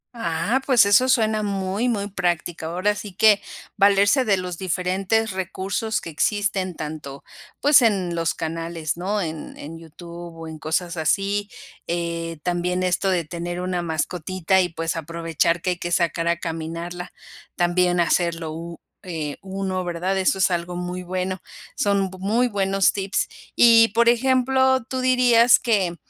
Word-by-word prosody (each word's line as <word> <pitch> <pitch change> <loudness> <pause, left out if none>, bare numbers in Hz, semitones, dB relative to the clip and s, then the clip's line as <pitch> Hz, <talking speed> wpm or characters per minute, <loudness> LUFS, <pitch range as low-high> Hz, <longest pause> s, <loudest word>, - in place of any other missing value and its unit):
Ah, 195 +5 -1
pues, 245 -6 +6
eso 255 +6 +4
suena 220 -3 +2
muy, 200 +3 -1
muy 205 -4 -1
práctico. 175 -4 -2
Ahora 185 +5 0
sí 205 -2 -8
que, 210 +1 +5 0.4
valerse 200 +6 +4
de 200 -4 +3
los 180 -2 -5
diferentes 190 +4 0
recursos 190 +4 -3
que 165 - -7
existen 190 +2 -1
tanto, 150 -3 -7 0.4
pues, 290 -1 +6
en 195 -7 +1
los 165 -1 -1
canales, 165 -1 -4
¿no?, 195 +4 -2
en 160 -2 -6
en 165 +3 -9
YouTube 170 +1 -10
o 165 0 -8
en 160 -1 -8
cosas 170 +2 -2
así, 200 +5 0 0.4
eh, 170 -1 -3
también 180 +1 -1
esto 185 +2 +1
de 175 -3 0
tener 175 +2 -5
una 180 -1 -2
mascotita 175 +3 0
y, 180 - 0
pues, 165 0 -3
aprovechar 165 +1 -1
que 185 - +1
hay 180 - -3
que 175 - -4
sacar 170 -1 +1
a 170 0 +2
caminarla. 170 +2 -5 0.4
También 175 0 +2
hacerlo 170 -1 0
u 170 +1 -8 0.2
eh, 160 -5 -5
uno, 190 -1 -3
¿verdad?, 175 +2 -2
eso 190 +1 +2
es 190 - +2
algo 175 0 -2
muy 180 +1 -4
bueno. 185 +1 -3 0.3
Son 200 -6 +1
muy 225 +6 +1
buenos 195 -1 +2
tips. 195 0 -1 0.3
Y, 230 -1 +7
por 235 0 +5
ejemplo, 260 +1 +3
¿tú 260 +2 -4
dirías 250 -2 +5
que 200 -8 0
180 Hz, 155 wpm, -23 LUFS, 170-205 Hz, 0.4 s, Y